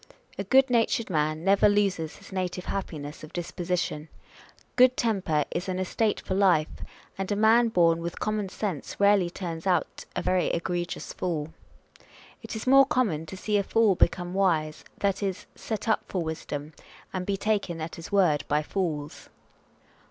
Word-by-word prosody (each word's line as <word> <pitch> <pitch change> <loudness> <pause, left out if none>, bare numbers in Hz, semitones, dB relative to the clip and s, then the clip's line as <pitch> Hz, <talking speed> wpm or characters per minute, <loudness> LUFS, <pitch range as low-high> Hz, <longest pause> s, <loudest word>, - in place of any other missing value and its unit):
A - - 0
good 265 -1 +4
natured 230 -2 +1
man 155 0 0
never 195 +2 +5
loses 195 -6 0
his - - -15
native 180 -1 -3
happiness 155 -7 -5
of 155 - -11
disposition: 175 -3 -3 0.7
good 255 0 +5
temper 185 -10 +1
is 185 - -3
an 185 - -2
estate 205 +3 0
for - - -3
life; 185 -6 +3 0.5
and 195 +1 -3
a - - +2
man 225 +3 +5
born 170 -5 +3
with 170 +1 -5
common 215 -2 -1
sense 185 -7 -4
rarely 200 -3 +4
turns 170 -1 -5
out 180 -2 0
a - - -2
very 185 -3 +2
egregious 175 0 -3
fool. 160 -3 -3 0.9
It - - -7
is 220 - -5
more 270 +1 +7
common 210 - 0
to 190 - -8
see 210 +2 0
a 200 - +1
fool 220 0 +3
become 175 0 +1
wise, 160 -6 +1
that 200 0 0
is, 195 -2 -3
set 220 -1 -5
up 220 - +2
for 180 -3 -2
wisdom, 155 -1 -5 0.4
and 185 -1 -2
be 195 +1 -1
taken 200 -5 -1
at 160 +1 -5
his 165 - -9
word 175 -8 +3
by 150 +1 +1
fools. 155 -5 -4
185 Hz, 165 wpm, -27 LUFS, 165-205 Hz, 0.9 s, more